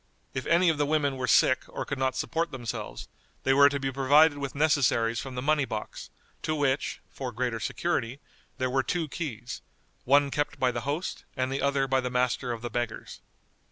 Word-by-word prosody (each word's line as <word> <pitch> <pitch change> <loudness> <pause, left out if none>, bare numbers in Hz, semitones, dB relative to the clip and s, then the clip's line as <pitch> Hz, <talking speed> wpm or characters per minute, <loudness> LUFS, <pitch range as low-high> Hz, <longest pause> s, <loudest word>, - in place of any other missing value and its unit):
If 130 - -4
any 170 +2 +4
of 155 -3 0
the 145 - +3
women 145 -2 +1
were 130 -1 -3
sick 130 0 +5
or - - -5
could 140 - -4
not 130 -1 +1
support 165 0 -1
themselves, 120 -4 -6 0.4
they 135 - +3
were 140 +1 +7
to 140 0 -2
be 135 0 -2
provided 145 +3 +4
with 140 -1 -4
necessaries 135 -6 +2
from 135 -2 -6
the 125 - -3
money 150 0 +3
box, 110 -5 -6 0.3
to 155 - -1
which 140 -2 0
(for 130 -2 -5
greater 120 -1 -2
security) 135 -1 -2 0.4
there 130 -2 -1
were 135 +1 +2
two 165 +3 -2
keys, 125 -6 -5 0.4
one 140 +2 +4
kept 145 0 -2
by 130 -1 +3
the 120 -1 -3
host 155 +6 -3
and 130 0 0
the 135 - -2
other 140 -1 +1
by 135 0 +2
the 125 - -2
Master 125 0 0
of 115 0 -5
the 120 - -3
Beggars. 120 -1 -4
135 Hz, 200 wpm, -28 LUFS, 125-145 Hz, 0.4 s, were